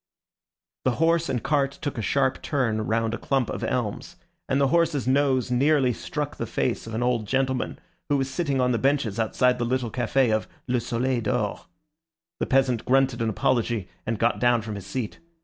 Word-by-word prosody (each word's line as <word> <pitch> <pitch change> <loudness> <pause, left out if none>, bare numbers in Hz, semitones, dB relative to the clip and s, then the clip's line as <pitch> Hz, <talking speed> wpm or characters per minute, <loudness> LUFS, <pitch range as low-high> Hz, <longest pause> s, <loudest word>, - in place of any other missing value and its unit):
The 130 - +2
horse 165 +1 +2
and 125 -3 -1
cart 140 -2 +1
took 145 -5 -3
a - - -1
sharp 130 +3 +1
turn 115 -7 0
round 115 0 0
a - - -3
clump 135 -4 0
of - - -5
elms, - - -2 0.3
and 135 - +2
the 140 -1 +3
horse's 160 -5 +2
nose 130 -2 +2
nearly 135 0 +3
struck - - -4
the - - -3
face - - -1
of 115 - -5
an 120 - 0
old 120 -3 0
gentleman 130 +1 0 0.3
who 145 - +3
was 135 -1 0
sitting 140 0 -1
on 125 0 +2
the 115 - +1
benches 135 -7 +1
outside 125 +3 +2
the - - 0
little 120 -1 -1
café 120 -1 +2
of 110 - -2 0.2
"Le 125 0 +1
Soleil 120 +2 -1
d'Or." 110 +6 -2 0.7
The - - -1
peasant 130 -3 +2
grunted 130 -2 +2
an 115 - +1
apology, 115 -3 0
and 115 0 -2
got 115 +3 +1
down 120 -2 +3
from 110 -1 -5
his 100 -2 -7
seat. 125 -5 -4
125 Hz, 195 wpm, -25 LUFS, 115-135 Hz, 0.7 s, the